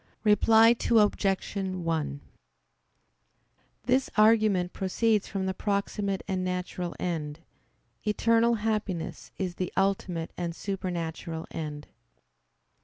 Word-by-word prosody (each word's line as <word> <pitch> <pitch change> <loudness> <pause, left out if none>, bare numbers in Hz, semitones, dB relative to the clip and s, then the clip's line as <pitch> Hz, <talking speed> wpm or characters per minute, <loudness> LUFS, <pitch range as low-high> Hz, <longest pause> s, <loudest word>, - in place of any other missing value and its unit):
Reply 220 +1 +6 0.2
Obj. 205 -3 +2
1: 165 -7 -2 1.6
This 255 +3 +2
argument 215 -4 +4
proceeds 210 +2 +1
from 195 -2 -3
the 190 - -1
proximate 200 0 -1
and 190 -2 -1
natural 180 -1 -3
end. 160 -3 -3 0.6
Eternal 230 +2 +3
happiness 210 -6 -3
is 185 -2 -2
the 185 - -2
ultimate 190 -4 0
and 170 -1 -3
supernatural 170 -4 -4
end. 150 -2 -5
190 Hz, 95 wpm, -28 LUFS, 175-210 Hz, 1.6 s, Reply